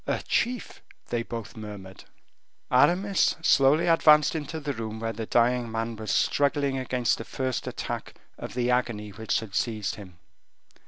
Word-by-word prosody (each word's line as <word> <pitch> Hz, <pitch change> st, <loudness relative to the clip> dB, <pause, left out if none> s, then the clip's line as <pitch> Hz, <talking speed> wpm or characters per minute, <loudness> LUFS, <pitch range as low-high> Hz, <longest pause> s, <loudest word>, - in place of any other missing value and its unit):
"A -, -, -1 dB
chief!" 245 Hz, 0 st, -1 dB, 0.3 s
they 120 Hz, -, 0 dB
both 115 Hz, -2 st, -7 dB
murmured. 100 Hz, -3 st, -9 dB, 0.7 s
Aramis 180 Hz, +9 st, +3 dB
slowly 140 Hz, +1 st, +4 dB
advanced 155 Hz, -3 st, +5 dB
into 160 Hz, 0 st, -4 dB
the 145 Hz, -2 st, -3 dB
room 110 Hz, -2 st, -5 dB
where 115 Hz, 0 st, -3 dB
the 110 Hz, 0 st, -5 dB
dying 120 Hz, 0 st, +2 dB
man 115 Hz, +1 st, -3 dB
was 110 Hz, 0 st, -7 dB
struggling 140 Hz, -1 st, +1 dB
against 125 Hz, -2 st, 0 dB
the -, -, -4 dB
first 130 Hz, +1 st, -3 dB
attack -, -, -5 dB, 0.2 s
of -, -, -8 dB
the 125 Hz, 0 st, +1 dB
agony 115 Hz, -4 st, -1 dB
which 110 Hz, +4 st, -1 dB
had 110 Hz, -4 st, -10 dB
seized 105 Hz, 0 st, -1 dB
him. 95 Hz, -4 st, -12 dB
120 Hz, 155 wpm, -27 LUFS, 110-140 Hz, 0.7 s, advanced